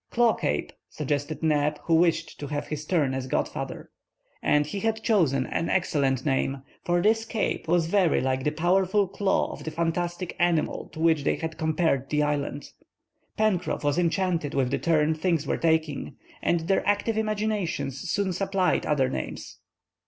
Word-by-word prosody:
"Claw 235 -2 +3
Cape," 75 - -2 0.2
suggested 145 +2 -3
Neb, 150 -1 +2
who 165 - 0
wished 165 0 +2
to 145 - -5
have 145 0 -3
his 150 0 -4
turn 150 -6 +1
as 130 -1 -3
godfather. - - -3 0.5
And 150 0 +3
he 175 +7 -4
had 220 +1 -1
chosen 155 - +2
an 165 - -2
excellent 140 -8 +1
name; 135 -1 0 0.2
for 175 -1 +1
this 225 +1 +3
Cape 225 -6 -2
was 170 0 +3
very 180 -1 +3
like 130 0 0
the 150 - +2
powerful 185 +5 +2
claw 195 +1 0
of - - -8
the - - -3
fantastic 175 +2 -2
animal 170 -3 +1
to - - -9
which 160 -3 +3
they - - +2
had 160 -1 -5
compared 160 -4 +1
the 150 0 +2
island. 145 -1 -2 0.7
Pencroff 200 -7 0
was 145 +3 +1
enchanted 170 -3 0
with 130 -2 +1
the 140 - 0
turn 160 -2 +2
things 160 -1 0
were - - 0
taking, 160 -3 0 0.3
and 170 -1 +1
their 190 +4 +1
active 205 +2 +1
imaginations 210 - -1
soon 190 +1 -1
supplied 195 0 0
other 140 -3 +2
names. 65 -1 -6
165 Hz, 165 wpm, -26 LUFS, 145-185 Hz, 0.7 s, Claw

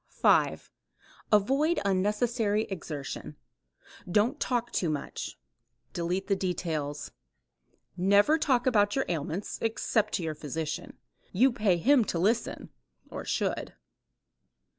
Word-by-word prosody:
5. - - +2 0.6
Avoid 270 - +3
unnecessary 210 +2 +1
exertion. 150 -6 -6 0.7
Don't 220 +10 +2
talk 240 -2 -1
too 175 - 0
much. 150 -2 -4 0.6
Delete 180 +3 -2
the 195 - +1
details. 160 -6 -3 0.8
Never 200 - +4
talk 255 -5 +2
about 205 -5 +3
your 270 - +1
ailments 170 +3 -3
except 220 -1 0
to 180 - -1
your 160 -1 -2
physician. 150 +1 -5 0.3
You 255 +8 +4
pay 210 -6 +2
him 255 - +4
to 175 - -2
listen 220 +7 0 0.4
(or - - -6
should). - - -2
205 Hz, 110 wpm, -29 LUFS, 170-235 Hz, 0.8 s, Never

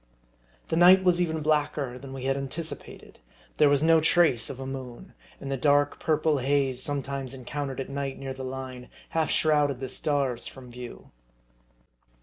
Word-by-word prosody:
The - - 0
night 180 +3 +7
was 180 -1 +3
even 160 -2 -1
blacker 145 -4 0
than 135 0 -10
we 135 -1 -7
had 135 0 +1
anticipated; 140 +4 -6 0.4
there 150 - +6
was 145 +1 +3
no 165 0 +5
trace 155 -7 +3
of 130 - -7
a 135 - -5
moon; 130 +4 -8 0.3
and 140 - -6
the 135 - -1
dark 145 +1 +2
purple 155 -2 +1
haze, 135 -1 +1
sometimes 140 -2 -3
encountered 135 +1 -5
at 135 - -3
night 140 -1 -4
near 135 -1 -5
the 130 0 -8
Line, 130 -1 -7 0.2
half 160 -2 0
shrouded 145 -4 +2
the 130 - -4
stars 135 -3 0
from 125 -2 -11
view. 125 0 -10
140 Hz, 165 wpm, -27 LUFS, 130-150 Hz, 0.4 s, night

